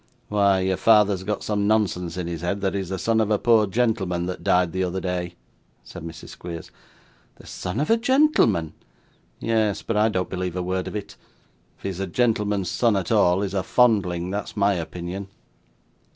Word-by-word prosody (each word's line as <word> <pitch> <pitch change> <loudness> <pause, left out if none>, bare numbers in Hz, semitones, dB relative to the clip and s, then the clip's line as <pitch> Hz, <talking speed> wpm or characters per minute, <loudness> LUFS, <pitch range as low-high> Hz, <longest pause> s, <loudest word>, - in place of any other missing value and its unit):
'Why, 100 -2 +3
your 95 0 0
father 105 -2 +5
has 95 -1 -5
got 105 +1 -3
some 105 -1 0
nonsense 95 -5 0
in 90 - -3
his 85 -2 -5
head 100 +3 -2
that 95 -1 0
he's 95 -3 -3
the 95 - -2
son 110 +3 +1
of 110 - 0
a 105 - +3
poor 110 -1 +4
gentleman 95 -5 0
that 90 0 -5
died 90 -1 +3
the 95 +1 -1
other 90 +1 -2
day,' 90 -1 -3 0.5
said - - -10
Mrs. 80 -1 -9
Squeers. 85 -2 -8 0.6
'The - - -17
son 90 +5 -5
of 150 - 0
a 225 - +5
gentleman!' 240 - +3 0.7
'Yes; 110 -3 0
but 115 - -2
I 110 +1 +4
don't 95 -3 -1
believe 90 -1 -4
a 90 - -2
word 95 +1 -2
of - - -6
it. 105 -1 -6 0.6
If - - -26
he's 95 -2 -4
a 95 - -2
gentleman's 105 -3 0
son 110 +4 +2
at 95 - -3
all, 95 -3 +3
he's 100 -1 -3
a 95 - +1
fondling, 90 -6 +2
that's 105 +2 -5
my 100 0 +3
opinion. 90 +2 -5
95 Hz, 195 wpm, -24 LUFS, 90-105 Hz, 0.7 s, father